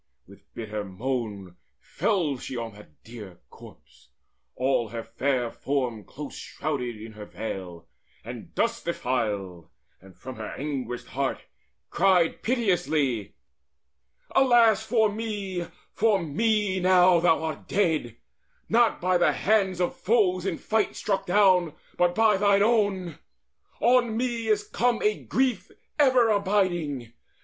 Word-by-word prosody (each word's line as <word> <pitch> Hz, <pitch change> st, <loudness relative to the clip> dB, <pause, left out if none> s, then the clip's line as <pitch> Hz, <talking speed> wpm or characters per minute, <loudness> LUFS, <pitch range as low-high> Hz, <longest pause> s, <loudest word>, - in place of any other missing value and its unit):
With -, -, -18 dB
bitter 110 Hz, -2 st, -4 dB
moan 100 Hz, -3 st, -4 dB, 0.2 s
Fell 175 Hz, -10 st, -1 dB
she 130 Hz, -, -6 dB
on 115 Hz, -2 st, -5 dB
that 75 Hz, -8 st, -17 dB
dear 105 Hz, -6 st, -11 dB
corpse, -, -, -17 dB, 0.5 s
all 130 Hz, -2 st, +1 dB
her 115 Hz, +1 st, -5 dB
fair 120 Hz, +1 st, -1 dB
form 125 Hz, -6 st, -2 dB
Close 150 Hz, 0 st, -8 dB
shrouded 125 Hz, -7 st, -4 dB
in 110 Hz, +1 st, -9 dB
her 105 Hz, -1 st, -10 dB
veil, 95 Hz, -6 st, -7 dB, 0.4 s
and 120 Hz, +7 st, -9 dB
dust 230 Hz, 0 st, -1 dB
defiled, 105 Hz, -, -2 dB, 0.3 s
And 95 Hz, -1 st, -17 dB
from 130 Hz, -2 st, -9 dB
her 110 Hz, -1 st, -6 dB
anguished 130 Hz, -4 st, -4 dB
heart 135 Hz, 0 st, -2 dB, 0.5 s
cried 180 Hz, -3 st, +2 dB
piteously: 160 Hz, -, 0 dB, 1.0 s
"Alas 235 Hz, -5 st, +4 dB
for 220 Hz, -1 st, +2 dB
me, 205 Hz, -5 st, -4 dB, 0.3 s
for 215 Hz, -2 st, +2 dB
me 200 Hz, +4 st, 0 dB
now 180 Hz, -1 st, +5 dB
thou 165 Hz, -1 st, +2 dB
art 160 Hz, -1 st, -5 dB
dead, 160 Hz, -, 0 dB, 0.5 s
Not 235 Hz, +1 st, +2 dB
by 180 Hz, 0 st, +2 dB
the 175 Hz, -, +3 dB
hands 195 Hz, -3 st, +1 dB
of 180 Hz, -, 0 dB
foes 190 Hz, -4 st, +1 dB
in 175 Hz, -4 st, -2 dB
fight 220 Hz, -1 st, -1 dB
struck 195 Hz, -2 st, -2 dB
down, 180 Hz, -4 st, +3 dB, 0.2 s
But 175 Hz, 0 st, +2 dB
by 220 Hz, -2 st, +4 dB
thine 200 Hz, 0 st, +4 dB
own! 200 Hz, -7 st, +1 dB, 0.6 s
On 240 Hz, -2 st, +3 dB
me 235 Hz, -2 st, -2 dB
is 210 Hz, -1 st, +2 dB
come 240 Hz, +2 st, +1 dB
a 425 Hz, 0 st, +1 dB
grief 260 Hz, -2 st, 0 dB, 0.3 s
Ever 260 Hz, -5 st, +5 dB
abiding! 175 Hz, -, 0 dB
175 Hz, 130 wpm, -26 LUFS, -, 1.0 s, now